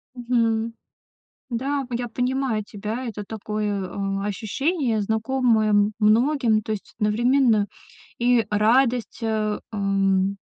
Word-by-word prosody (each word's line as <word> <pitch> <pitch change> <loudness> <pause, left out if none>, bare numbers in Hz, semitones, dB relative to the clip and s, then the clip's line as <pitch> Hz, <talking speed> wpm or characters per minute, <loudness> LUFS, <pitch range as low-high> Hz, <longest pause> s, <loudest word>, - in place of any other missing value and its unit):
Мгм. 230 -2 0 0.8
Да, 275 +4 -1
в 245 - -6
я 240 +1 -2
понимаю 250 -1 -1
тебя. 215 +5 -5
Это 210 -3 -5
такое, 210 -2 -3
а, 195 0 -3
ощущение, 230 - -1
знакомое 220 +1 +1
м 205 0 +3
многим. 225 +1 +3
То 220 - -5
есть 210 -2 -5
одновременно 225 0 +3 0.5
и 240 -2 +3
радость, 235 +3 +2
э, 215 -2 -1
эм 195 -1 +1
220 Hz, 115 wpm, -23 LUFS, 210-245 Hz, 0.8 s, м